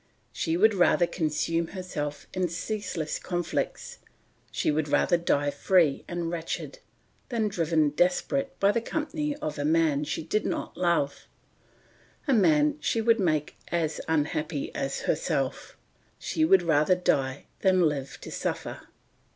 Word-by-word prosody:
She 165 +1 -1
would 220 +4 +5
rather 175 -2 +4
consume 165 0 -1
herself 150 -6 -4
in 185 -1 0
ceaseless 180 -2 -3
conflicts, 175 -2 -3 0.5
she - - 0
would 150 0 0
rather 145 +5 +3
die 145 -4 +1
free 165 -4 +2
and 175 -1 -3
wretched, 170 - -4 0.5
than 230 -4 0
driven 165 -6 +1
desperate 180 - 0
by 200 +1 +4
the 230 - 0
company 300 +2 -2
of 155 - -5
a - - 0
man 155 -2 +2
she 150 - -3
did 210 +7 0
not - - -3
love, 170 -5 0 1.0
a 275 - +3
man 155 -9 +4
she 225 - 0
would 230 0 +3
make 155 -6 0
as 165 -3 -1
unhappy 155 -1 -1
as 275 -3 -3
herself; - - -2 0.4
she 315 - -1
would 190 - +5
rather 160 +1 +3
die 140 -6 0
than 185 -2 +3
live 140 -3 -4
to - - -8
suffer." - - -4
170 Hz, 140 wpm, -27 LUFS, 150-195 Hz, 1.0 s, would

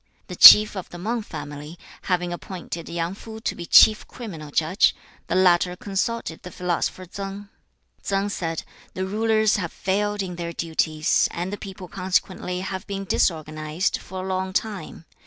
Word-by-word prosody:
The - - -6
chief 210 0 +10
of 190 - -6
the 175 - -9
Mang 225 +6 -2
family 150 -4 -8 0.3
having 180 -1 0
appointed 175 -2 -7
Yang 170 +1 -2
Fu 220 +2 -10
to 220 - -2
be 170 - -8
chief 215 -1 +6
criminal 165 -11 -8
judge, 165 +7 +2 0.3
the - - -1
latter 180 -1 +3
consulted 195 -1 -3
the 180 - -9
philosopher 180 +1 -2
Tsang. 200 +2 -7 0.5
Tsang 200 +1 -1
said, 165 -5 -3 0.3
'The 185 - -2
rulers 215 +2 +2
have 170 -5 -3
failed 205 +1 -1
in 180 -2 -6
their 170 -1 -4
duties, 160 -2 +1
and 180 +3 -4
the - - -1
people 195 -2 -9
consequently 185 0 -2
have 190 +1 -5
been 195 -1 -4
disorganised, 155 0 -1
for 185 0 -7
a - - -5
long 190 0 -2
time. 195 -6 -4
185 Hz, 160 wpm, -23 LUFS, 170-200 Hz, 0.5 s, chief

